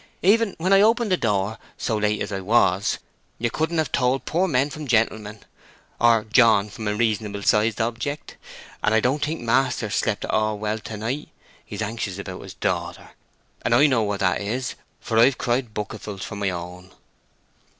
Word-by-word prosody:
"Even 210 +2 +3
when 185 +4 +2
I 195 - +7
opened 225 0 +3
the - - +5
door, 105 - -1 0.2
so 110 - -1
late 105 0 0
as - - -6
I 95 - -2
was, 100 -2 +2 0.4
you 120 0 -1
couldn't 160 +2 -1
have 160 -2 0
told 130 0 +1
poor 180 +4 +1
men 140 -2 +1
from 150 +1 -7
gentlemen, 110 -3 0 0.6
or 115 -2 +4
John 110 -2 +4
from 110 0 -6
a 105 - 0
reasonable 105 -2 -1
sized 105 +2 +2
object. 120 +6 -3 0.5
And 105 - +3
I - - +5
don't 135 +6 0
think 155 0 -2
maister's 115 -2 +1
slept 105 -3 0
at - - -3
all 110 0 +1
well 105 +1 -2
to 110 0 -7
night. 120 +8 -4 0.3
He's 105 +1 -5
anxious 105 -3 -4
about 95 -2 -7
his - - -10
daughter; - - -3 0.5
and - - +2
I 145 - +6
know 130 -6 +3
what 105 -2 -2
that 95 +1 +1
is, 125 +6 -2 0.3
for 110 -1 0
I've 125 +2 +5
cried 120 -2 -1
bucketfuls 105 -2 -5
for 105 - -7
my 100 -1 -1
own." 90 +1 -7
110 Hz, 185 wpm, -23 LUFS, 105-135 Hz, 0.6 s, I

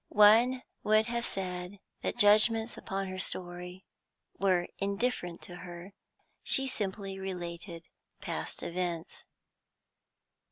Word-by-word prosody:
One 230 +5 +6 0.2
would 215 +1 +4
have 235 0 -1
said 180 0 -4 0.2
that - - -2
judgments 220 +1 +5
upon 195 0 -3
her 185 0 -5
story 180 0 -5 0.5
were 185 -3 +2
indifferent 200 -3 -1
to 175 - -8
her; 180 +2 -9 0.5
she 270 0 +4
simply 195 -5 -4
related 175 -2 -6 0.3
past - - -5
events. 170 -2 -4
195 Hz, 105 wpm, -31 LUFS, 180-215 Hz, 0.5 s, One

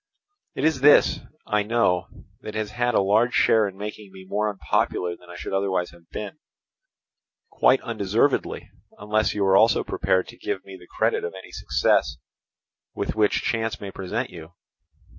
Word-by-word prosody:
It - - -3
is 155 -4 +2
this, 145 +1 +6 0.3
I 105 0 +1
know, 105 -4 +1 0.3
that 105 - -8
has 110 -1 -3
had 120 +1 0
a - - +4
large 110 +5 +2
share 110 -2 +4
in 95 -1 -9
making 105 -1 -7
me 95 0 -12
more 105 +3 -1
unpopular 90 -3 -1
than 90 0 -19
I 90 - -9
should 90 - -6
otherwise 95 -2 0
have 85 -1 -20
been—quite 160 - -4
undeservedly, - - -1 0.3
unless 110 +1 0
you 100 -1 +1
are 95 0 +4
also 110 +3 +4
prepared 95 0 0
to - - -12
give 95 - -4
me 95 - -10
the 90 -1 -15
credit - - 0
of 85 - -5
any 95 - -11
success 70 +2 +1 0.8
with - - -2
which 105 -1 +1
chance 110 -2 -1
may 100 -1 -7
present 95 +7 -4
you. 85 0 -11
105 Hz, 165 wpm, -24 LUFS, 95-110 Hz, 0.8 s, this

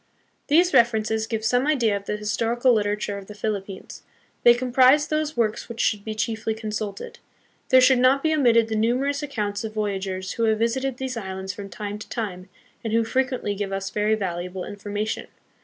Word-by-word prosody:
These 350 +5 +4
references 220 -1 +2
give 220 -1 -3
some 245 +4 +2
idea 240 -9 +2
of 200 0 -5
the 210 - -2
historical 230 +4 +1
liter 205 -2 +1
ature 205 -1 -4
of 195 - -13
the 210 - -10
Philippines. 205 -2 -5 0.4
They 240 0 +7
comprise 255 +4 +4
those 310 -1 -2
works 230 0 0
which 235 -1 -8
should 210 -2 +1
be 220 0 -5
chiefly 220 0 -2
consulted. 220 - -5 0.5
There 260 0 +7
should 255 0 +5
not 260 +2 +4
be 315 0 +2
omitted 235 -6 +4
the 220 - -2
numerous 255 +7 +1
accounts 210 -7 -3
of 215 -1 -6
voyagers 190 -3 -2
who 230 - 0
have 220 -1 +2
visited 250 +3 -1
these 260 -2 -4
islands 190 -2 -5
from 200 +1 -8
time 205 +1 -6
to - - -10
time, 190 -5 -5 0.3
and 225 -1 -3
who 230 0 +3
frequently 255 -2 -1
give 200 -1 -4
us 195 0 -3
very 210 +1 +1
valuable 180 -2 -4
information. 205 +1 -4
220 Hz, 190 wpm, -24 LUFS, 205-250 Hz, 0.5 s, They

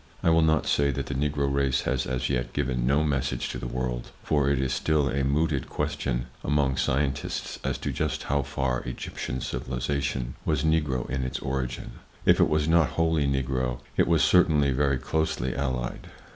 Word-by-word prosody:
I 85 - +4
will 80 0 +5
not 80 -1 +3
say 70 0 +2
that 70 - -2
the - - -4
Negro 70 0 0
race 70 -1 +2
has 65 0 -1
as 65 0 -1
yet 60 -2 -1
given 65 -3 0
no 70 +3 +3
message 70 -4 -1
to - - -4
the - - -4
world, 60 -1 -3
for 70 -2 +2
it 70 -2 +2
is 65 0 0
still 75 +2 +1
a 70 0 0
mooted 70 0 0
question - - -2 0.2
among 70 -2 +1
scientists 70 +1 -1
as - - -1
to - - -3
just - - -2
how 70 0 +1
far 65 -2 -1
Egyptian 65 0 -5
civilization 65 0 -2
was 75 -2 0
Negro 75 -5 +1
in 65 +1 -2
its 65 - -2
origin; 65 -2 -4 0.3
if - - +5
it - - +5
was 75 0 +1
not 80 -3 +4
wholly 80 -3 +2
Negro, 65 -2 -1 0.2
it - - +3
was 80 -2 +4
certainly 75 -6 +4
very 70 0 +2
closely 75 -2 -1
allied. 65 -3 -3
70 Hz, 185 wpm, -27 LUFS, 65-75 Hz, 0.3 s, will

